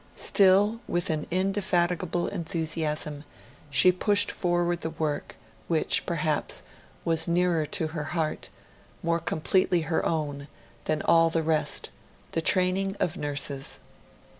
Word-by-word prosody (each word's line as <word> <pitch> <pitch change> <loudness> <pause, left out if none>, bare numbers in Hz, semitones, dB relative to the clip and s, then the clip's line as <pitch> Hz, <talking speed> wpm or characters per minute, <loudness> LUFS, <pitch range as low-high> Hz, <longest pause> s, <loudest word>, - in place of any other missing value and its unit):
Still, 200 +3 +4
with 175 -1 0
an 155 -1 -3
indefatigable 180 -2 0
enthusiasm, 155 -4 -2 0.5
she 180 +6 +5
pushed 205 +3 +3
forward 175 -1 0
the 160 - -2
work, 155 -2 -3 0.3
which, 160 -2 +1
perhaps, 155 -3 -1 0.4
was 165 0 +3
nearer 170 -2 +1
to 155 +2 -2
her 155 -2 -4
heart, 160 0 -3 0.5
more 170 0 +1
completely 175 +2 +1
her 160 +1 -1
own, 145 -3 -2 0.4
than 155 0 0
all 165 0 +5
the 165 0 0
rest 155 -1 0 0.4
the 165 - -1
training 190 +3 +2
of 160 - 0
nurses. 140 -1 -3
165 Hz, 120 wpm, -27 LUFS, 155-180 Hz, 0.5 s, she